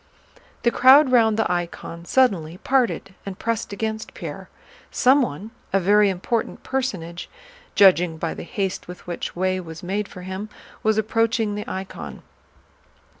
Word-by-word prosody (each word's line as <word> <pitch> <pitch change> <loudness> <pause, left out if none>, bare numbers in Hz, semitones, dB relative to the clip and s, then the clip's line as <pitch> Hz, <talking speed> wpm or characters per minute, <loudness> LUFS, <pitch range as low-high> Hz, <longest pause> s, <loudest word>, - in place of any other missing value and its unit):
The 235 - +4
crowd 260 +3 +7
round 225 -3 +4
the 220 - +1
icon 170 -1 -4
suddenly 180 -10 +2
parted 240 -5 0
and 195 -2 -7
pressed 230 -3 -2
against 220 +1 -4
Pierre. - - -7 0.4
Someone, 240 - +2 0.2
a 195 - +3
very 205 +2 +4
important 195 +5 -2
personage 185 -11 -3 0.5
judging 180 -4 +5
by 165 0 -2
the - - -8
haste 195 +1 -3
with 180 0 -10
which 175 -1 -5
way 185 +1 0
was 165 -2 -9
made 200 +3 -2
for 180 -2 -11
him, 190 +3 -5 0.3
was 220 0 +2
approaching 225 0 +1
the 210 0 -4
icon. 190 0 -7
200 Hz, 140 wpm, -23 LUFS, 180-225 Hz, 0.5 s, crowd